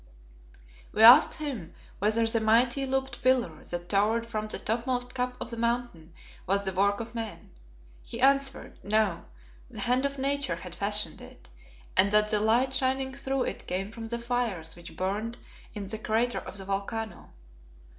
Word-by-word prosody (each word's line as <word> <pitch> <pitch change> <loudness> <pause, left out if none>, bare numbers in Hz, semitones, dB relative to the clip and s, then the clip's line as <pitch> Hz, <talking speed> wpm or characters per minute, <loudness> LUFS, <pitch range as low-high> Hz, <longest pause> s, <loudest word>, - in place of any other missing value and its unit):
We 220 - +3
asked 240 +3 +9
him 265 - -6 0.2
whether 220 +3 +2
the 225 0 +1
mighty 240 +5 +3
looped 265 -2 -2
pillar 245 -11 +1
that 175 0 -5
towered 215 +4 +2
from 215 -2 -3
the - - -4
topmost 245 +2 -2
cup 250 -1 -2
of 240 - -6
the 235 - -6
Mountain 235 -9 -2 0.3
was 200 +1 +1
the 190 -1 -3
work 200 +2 +2
of 230 +1 -6
men. 225 -2 -6 0.5
He 230 - -8
answered, 275 +1 +1
No; 210 -3 +1 0.4
the - - -7
hand 250 +2 +2
of 280 0 -2
Nature 275 +1 0
had 180 -2 -9
fashioned 205 +3 +1
it, - - -14 0.5
and 195 +1 +4
that 210 0 +4
the 210 - +3
light 235 +5 +2
shining 265 0 +1
through 270 -1 -1
it - - -5
came 195 +3 -3
from 225 0 -7
the 235 +1 -3
fires 235 -9 -2
which 170 0 -11
burned 210 +5 -2 0.4
in 205 -1 -4
the 215 +3 -6
crater 230 +3 0
of - - -8
the 195 - -5
volcano. 200 +1 -4
225 Hz, 170 wpm, -28 LUFS, 200-250 Hz, 0.5 s, asked